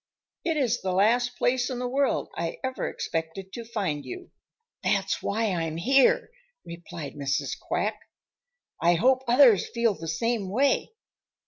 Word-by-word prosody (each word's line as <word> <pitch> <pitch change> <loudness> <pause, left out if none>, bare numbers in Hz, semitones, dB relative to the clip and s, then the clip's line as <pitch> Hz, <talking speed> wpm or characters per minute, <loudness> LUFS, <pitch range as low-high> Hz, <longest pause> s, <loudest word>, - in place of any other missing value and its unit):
It 325 -2 0
is 245 -5 +1
the 185 -1 -1
last 240 +5 +2
place 245 0 +1
in 255 - -3
the 250 0 -2
world 275 +2 0
I - - -3
ever 260 0 -2
expected 165 +4 -4
to 235 - -6
find 195 -11 -3
you." 365 0 -9 0.5
"That's - - 0
why 220 +1 0
I'm 165 -3 -2
here," 275 - +3 0.3
replied 170 -3 -8
Mrs. 140 -1 -2
Quack. - - -2 0.8
"I 175 +1 +4
hope 255 +8 +3
others 240 -5 +5
feel 235 -2 +1
the 165 -3 -8
same 205 +5 -1
way. 270 - +1
230 Hz, 145 wpm, -26 LUFS, 175-255 Hz, 0.8 s, others